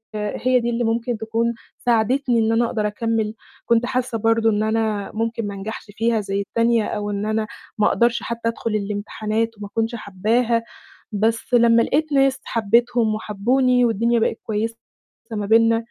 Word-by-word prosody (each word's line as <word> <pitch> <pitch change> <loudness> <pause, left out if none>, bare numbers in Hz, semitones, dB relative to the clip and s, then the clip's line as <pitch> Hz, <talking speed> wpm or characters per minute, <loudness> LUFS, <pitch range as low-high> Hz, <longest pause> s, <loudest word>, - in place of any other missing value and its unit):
آآ 210 -1 -3
هي 255 0 +4
دي 235 0 -1
اللي 240 0 -1
ممكن 230 +1 -1
تكون 225 +1 -1 0.3
ساعدتني 240 +1 +2
إن 220 0 +2
أنا 230 +1 +3
أقدر 215 -2 -1
أكمّل. 220 0 -1 0.3
كنت 235 +1 +3
حاسّة 250 -2 -1
برضه 225 +1 +3
إن 210 0 +1
أنا 220 -2 -1
ممكن 225 0 -2
ما 200 - -5
أنجحش 205 +3 -6
فيها 225 +2 +1
زي 195 0 -2
التانية 230 +2 +1
أو 210 -1 -3
إن 200 0 -2
أنا 215 0 -1 0.3
ما 210 - +3
أقدرش 235 0 +2
حتى 230 0 -2
أدخُل 230 0 -4
الإمتحانات 215 +2 -2
وما 205 0 -7
أكونش 225 +3 -2
حبّاها، 230 +3 0 0.5
بس 225 +4 -1
لمّا 235 -1 +5
لقيت 305 +4 0
ناس 270 -1 +3
حبّيتهم 230 0 +2
وحبّوني 245 +4 +2
والدنيا 230 +1 +2
بقت 225 - 0
كويسة 225 +1 -2 0.5
ما 210 -2 -2
بيننا 225 +2 +4
225 Hz, 165 wpm, -21 LUFS, 215-235 Hz, 0.5 s, لمّا